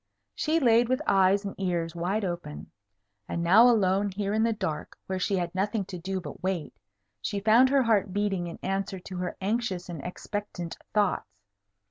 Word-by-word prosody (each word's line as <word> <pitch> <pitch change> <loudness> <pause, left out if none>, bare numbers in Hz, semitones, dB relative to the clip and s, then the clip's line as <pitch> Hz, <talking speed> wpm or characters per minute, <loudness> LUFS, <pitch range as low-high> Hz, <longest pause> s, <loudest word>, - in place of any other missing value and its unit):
She 315 +2 +1
laid 235 -3 +4
with 255 +1 +2
eyes 195 +1 +3
and 200 - -4
ears 175 -3 -1
wide 190 +5 -1
open. 175 -4 -5 0.6
And 170 - -2
now 215 +8 +7
alone 200 -3 +3
here 200 +1 -2
in 220 - +2
the 230 +1 +3
dark, 185 -8 -4
where 190 0 -3
she 195 +2 0
had 175 -2 -2
nothing 200 +2 -1
to 180 -1 -7
do 190 +2 -3
but 175 - -9
wait, 180 -5 -2 0.5
she 200 - -2
found 225 +5 +5
her 275 -1 +4
heart 205 -4 +2
beating 195 -3 -1
in 170 - -7
answer 195 0 -2
to 180 +1 -8
her 180 -1 -3
anxious 195 -3 -1
and 165 -5 -6
expectant 180 -2 -5 0.2
thoughts. 145 - -1
195 Hz, 180 wpm, -28 LUFS, 180-210 Hz, 0.6 s, now